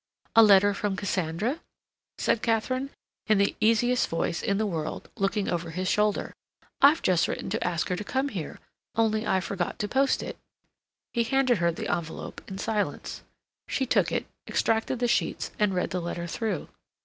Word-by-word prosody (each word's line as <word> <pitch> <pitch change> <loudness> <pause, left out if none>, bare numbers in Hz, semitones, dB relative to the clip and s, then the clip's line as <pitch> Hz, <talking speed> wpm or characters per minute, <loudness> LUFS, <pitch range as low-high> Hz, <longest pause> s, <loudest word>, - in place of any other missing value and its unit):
"A 225 - +9
letter 205 -1 +6
from 200 0 -1
Cassandra?" 190 - -1 0.6
said 230 - +1
Katharine, 255 +4 0 0.4
in 215 - +4
the 200 0 +2
easiest 230 +3 +3
voice 165 +1 -1
in 200 - 0
the 220 - +1
world, 165 -6 -4
looking 195 +1 0
over 170 -1 -2
his 185 +3 -3
shoulder. 210 +2 +1 0.5
"I've 290 +3 +6
just 180 -3 +3
written - - -4
to 220 - -1
ask 170 -3 0
her 180 - +1
to 210 - -4
come 265 +6 -1
here, 185 - -6 0.4
only 220 -1 +1
I 190 - +3
forgot 185 -2 -3
to 210 - -2
post 270 +5 +2
it." - - -7 0.7
He 235 - +2
handed 255 -2 +2
her 170 0 +3
the 165 - -5
envelope 165 -2 -6
in 190 - -6
silence. 210 +1 -2 0.5
She 265 - 0
took - - +2
it, - - -1 0.2
extracted 225 +3 +1
the 245 0 +1
sheets, 235 - 0
and 205 -3 +2
read 180 - -1
the 180 - -1
letter 170 0 -4
through. 200 0 -3
205 Hz, 175 wpm, -27 LUFS, 180-230 Hz, 0.7 s, A